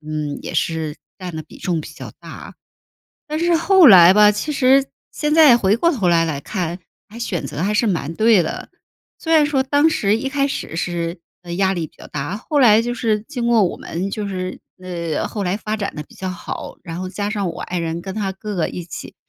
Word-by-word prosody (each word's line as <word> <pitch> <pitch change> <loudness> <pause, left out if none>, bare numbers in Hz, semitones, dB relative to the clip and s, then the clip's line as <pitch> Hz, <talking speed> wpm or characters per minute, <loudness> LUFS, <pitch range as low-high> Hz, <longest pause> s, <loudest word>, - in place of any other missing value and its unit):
嗯， 150 -1 -4
也 - - -6
是 160 -2 -1 0.2
占 180 -4 -7
的 155 - -5
比 155 - -15
重 175 -4 -1
比 - - -9
较 - - -9
大。 - - -11 0.7
但 305 +1 -3
是 340 0 +2
后 360 0 +6
来 180 -4 +9
吧， 210 +1 +7
其 210 +9 -3
实 270 -1 +4 0.3
现 300 0 -1
在 305 -6 +7
回 205 -1 +2
过 335 - +3
头 220 - -1
来 165 -1 +3
来 150 -4 -3
看， 175 0 -3 0.3
还 220 - -12
选 210 -7 -3
择 155 - -4
还 205 +2 0
是 220 +2 +2
蛮 165 -5 -2
对 215 -1 +4
的。 155 - -6 0.5
虽 325 - -1
然 310 -2 +6
说 275 -3 +1
当 285 +4 +3
时 210 -8 +1
一 270 +4 -3
开 280 0 0
始 270 - -5
是， 170 0 -3 0.2
呃， 175 -1 -7
压 190 +1 +1
力 170 -4 -3
比 - - -29
较 - - -13
大， 150 +7 -4
后 290 +6 -1
来 225 -4 +6
就 240 +1 -2
是 220 -4 0
经 245 0 -4
过 230 -3 +4
我 180 - -1
们 185 +4 -4
就 210 -1 -3
是 185 -1 -5 0.2
呃 170 -4 -3
后 210 - -4
来 185 +2 -1
发 215 0 -3
展 200 -2 -4
得 150 - -5
比 - - -21
较 190 - -5
好， 185 - -7
然 170 -1 -6
后 185 0 -4
加 205 +1 -3
上 200 -4 -2
我 - - -7
爱 180 - -3
人 165 0 -3
跟 190 +1 -6
他 200 -2 -2
哥 210 +2 -7
哥 170 - 0
一 175 - -6
起。 160 -2 -9
195 Hz, 250 characters per minute, -20 LUFS, 170-235 Hz, 0.7 s, 来